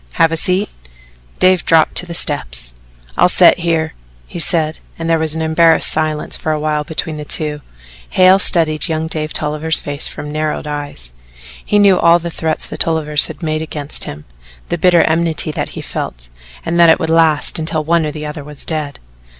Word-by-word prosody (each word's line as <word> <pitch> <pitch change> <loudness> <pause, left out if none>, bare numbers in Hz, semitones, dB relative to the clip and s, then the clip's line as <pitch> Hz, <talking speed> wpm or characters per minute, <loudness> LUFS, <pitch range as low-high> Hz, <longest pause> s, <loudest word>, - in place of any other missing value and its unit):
"Have 165 - +2
a - - -1
seat." 185 +5 0 0.7
Dave 185 -2 +3
dropped 160 -1 +3
to 180 - +4
the 170 - -5
steps. - - +1 0.4
"I'll - - +4
set - - +5
here," 165 -2 -1 0.3
he - - -9
said, 160 -2 +1 0.2
and 165 - -5
there 165 -1 +1
was 160 -1 -1
an 160 - -3
embarrassed 160 +1 +3
silence 155 -1 -2
for 155 - -3
a 155 - -1
while 150 0 -1
between 160 +1 -4
the 150 - -6
two. 150 0 0 0.5
Hale 185 +1 +4
studied 160 -5 +2
young 160 -1 -2
Dave's 155 -1 -3 0.4
face 145 0 0
from 150 - -8
narrowed 155 0 -3
eyes. 145 - -6 0.5
He 210 - 0
knew 200 -3 +4
all 170 0 +5
the 170 0 -6
threats 160 -1 -3
the - - -7
Tolliver 160 -2 -1
had - - -10
made 155 -1 -2
against 150 -2 -4
him, 75 +1 -9 0.4
the 175 - -1
bitter 175 -1 +4
enmity 160 -1 0
that - - -4
he - - -5
felt, - - -6 0.4
and 170 +1 -1
that 170 -1 +6
it 160 - +4
would 160 -2 -2
last 160 -2 +3
until 160 0 -2
one 165 +1 +1
or 150 - -3
the 150 0 -7
other 150 0 -7
was 150 0 -11
dead. 150 -4 -3
160 Hz, 190 wpm, -15 LUFS, 150-165 Hz, 0.7 s, that